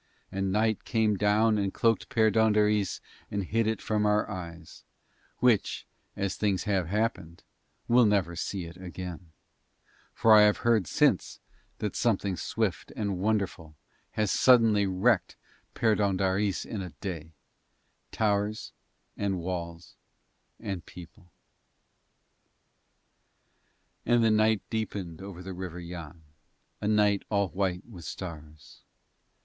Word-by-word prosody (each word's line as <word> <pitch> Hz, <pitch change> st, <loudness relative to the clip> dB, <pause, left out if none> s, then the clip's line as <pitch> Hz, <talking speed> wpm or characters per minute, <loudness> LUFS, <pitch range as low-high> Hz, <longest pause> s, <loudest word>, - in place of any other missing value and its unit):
And 95 Hz, 0 st, -1 dB
night 110 Hz, +1 st, +1 dB
came 110 Hz, -2 st, +1 dB
down 105 Hz, +2 st, +3 dB
and 100 Hz, -1 st, 0 dB
cloaked 115 Hz, +2 st, +1 dB
Perdóndaris 105 Hz, -2 st, +2 dB, 0.3 s
and 100 Hz, -1 st, -2 dB
hid 110 Hz, +4 st, 0 dB
it 110 Hz, 0 st, 0 dB
from 105 Hz, -1 st, +1 dB
our 105 Hz, 0 st, +2 dB
eyes, 85 Hz, -3 st, -8 dB, 0.5 s
which 120 Hz, -5 st, +2 dB, 0.3 s
as 100 Hz, -1 st, -1 dB
things 100 Hz, -4 st, 0 dB
have 95 Hz, -5 st, 0 dB
happened 95 Hz, -4 st, -2 dB, 0.4 s
will 120 Hz, -1 st, +5 dB
never 95 Hz, -5 st, +1 dB
see 90 Hz, +1 st, -3 dB
it 85 Hz, +2 st, -10 dB
again; 90 Hz, -2 st, -8 dB, 0.8 s
for 115 Hz, -, +4 dB
I 105 Hz, -, +9 dB
have 105 Hz, 0 st, +5 dB
heard 110 Hz, -7 st, +3 dB
since -, -, +1 dB, 0.4 s
that 105 Hz, -, -3 dB
something 100 Hz, -5 st, +1 dB
swift 80 Hz, -, -2 dB
and 100 Hz, -4 st, -2 dB
wonderful 95 Hz, -6 st, -1 dB, 0.4 s
has 105 Hz, -2 st, 0 dB
suddenly 115 Hz, -5 st, +5 dB
wrecked 95 Hz, +1 st, +1 dB, 0.4 s
Perdóndaris 100 Hz, -2 st, +1 dB
in 105 Hz, -, -5 dB
a 90 Hz, -, -6 dB
day 80 Hz, -3 st, -6 dB, 0.8 s
towers, 105 Hz, 0 st, -1 dB, 0.4 s
and 100 Hz, -2 st, -1 dB
walls, 85 Hz, -1 st, -6 dB, 0.6 s
and 100 Hz, -6 st, -5 dB
people. 85 Hz, 0 st, -13 dB, 2.7 s
And 120 Hz, 0 st, +3 dB
the 110 Hz, -, +4 dB
night 110 Hz, -1 st, +3 dB
deepened 100 Hz, -6 st, -4 dB
over 95 Hz, -2 st, -8 dB
the 95 Hz, 0 st, -6 dB
River 90 Hz, -1 st, -6 dB
Yann, 85 Hz, -2 st, -9 dB, 0.6 s
a 105 Hz, -, -1 dB
night 105 Hz, -1 st, +3 dB
all 100 Hz, -2 st, +1 dB
white 90 Hz, +1 st, -2 dB
with 95 Hz, -8 st, -12 dB
stars. 75 Hz, -1 st, -9 dB
100 Hz, 120 wpm, -28 LUFS, 90-110 Hz, 2.7 s, I